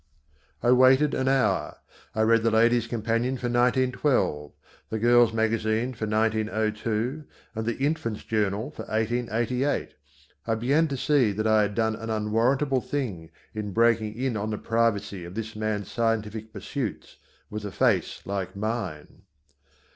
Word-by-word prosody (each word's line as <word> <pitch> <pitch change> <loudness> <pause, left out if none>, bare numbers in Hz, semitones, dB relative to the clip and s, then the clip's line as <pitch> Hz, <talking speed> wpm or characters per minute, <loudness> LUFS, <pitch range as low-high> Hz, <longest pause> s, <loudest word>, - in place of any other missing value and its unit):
I 120 - +4
waited 130 +3 +5
an 130 - 0
hour. 130 -8 +1 0.4
I 110 - +2
read 115 +1 +4
the 115 - +2
Ladies 115 +1 +3
Companion 115 +3 -1
for 125 - -6
1912, 125 - +1 0.4
the 110 - -2
Girls 120 +1 +5
Magazine 110 +2 0
for 110 -2 -4
1902 110 +4 -1 0.3
and 110 -1 -4
the 120 - -1
Infants 135 -6 -2
Journal 110 +4 -1
for - - -8
1888. 120 +4 -1 0.5
I 115 - +1
began 140 +8 +2
to 140 -2 -3
see 130 -5 +3
that 110 +2 -2
I 110 -1 +4
had 105 -1 -1
done 110 -1 +1
an 115 +1 -7
unwarrantable 120 +6 +1
thing 105 - -4 0.2
in 105 -2 -4
breaking 115 -1 +2
in 125 0 -1
on 105 +1 -2
the 105 - -2
privacy 105 -5 0
of 85 +2 -9
this 110 0 -5
man's 105 -2 -3
scientific 110 -1 -1
pursuits 110 +3 -5 0.3
with 105 0 -5
a 100 - -4
face 105 -7 +1
like 95 -2 -4
mine. 100 -7 -4
110 Hz, 145 wpm, -26 LUFS, 105-125 Hz, 0.5 s, waited